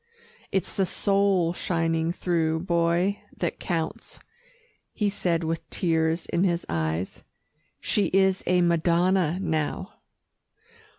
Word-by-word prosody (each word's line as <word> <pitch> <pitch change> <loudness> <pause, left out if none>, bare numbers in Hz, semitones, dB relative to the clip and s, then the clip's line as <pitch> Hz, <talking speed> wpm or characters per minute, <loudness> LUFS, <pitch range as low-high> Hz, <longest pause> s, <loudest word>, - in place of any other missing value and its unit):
"It's 190 - -1
the 190 -2 +1
soul 195 -4 +2
shining 165 -2 0
through, 165 -3 0
Boy, 170 +3 +1 0.2
that - - -2
counts," 165 -3 -4 0.7
he 205 -2 0
said 175 -4 0
with 165 0 -3
tears 165 -1 0
in 175 - 0
his 175 -2 0
eyes. 80 +2 -2 0.6
"She 205 - +1
is 190 0 +2
a 180 0 +3
madonna 170 0 +2
now." 160 +1 -2
170 Hz, 110 wpm, -26 LUFS, 165-185 Hz, 0.7 s, a